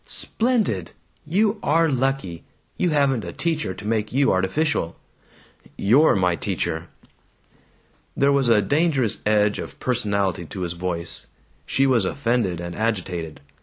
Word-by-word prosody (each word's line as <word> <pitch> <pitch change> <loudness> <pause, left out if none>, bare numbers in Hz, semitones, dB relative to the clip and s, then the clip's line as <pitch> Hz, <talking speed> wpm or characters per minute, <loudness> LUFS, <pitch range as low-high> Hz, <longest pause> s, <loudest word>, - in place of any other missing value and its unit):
"Splendid! 220 - -1 0.3
You 205 +6 +1
are 165 +3 +3
lucky. 135 - -1 0.3
You 180 - +1
haven't 140 -6 +2
a - - -5
teacher 155 - -2
to 105 - -10
make 110 -1 -1
you 135 +2 +3
artificial." 95 - 0 0.8
"You're 130 +11 +4
my 90 -3 +2
teacher!" 80 0 -3 1.3
There 140 +1 +4
was 140 -3 +2
a 105 -3 +4
dangerous 140 - +1
edge 105 -1 +2
of 75 -3 -8
personality 100 -8 -1
to 95 - -7
his 85 -1 -2
voice. 85 -1 -4 0.4
She 135 - +2
was 125 -5 +3
offended 115 -5 0
and 85 0 -5
agitated. 90 -8 -3
110 Hz, 130 wpm, -23 LUFS, 90-140 Hz, 1.3 s, You're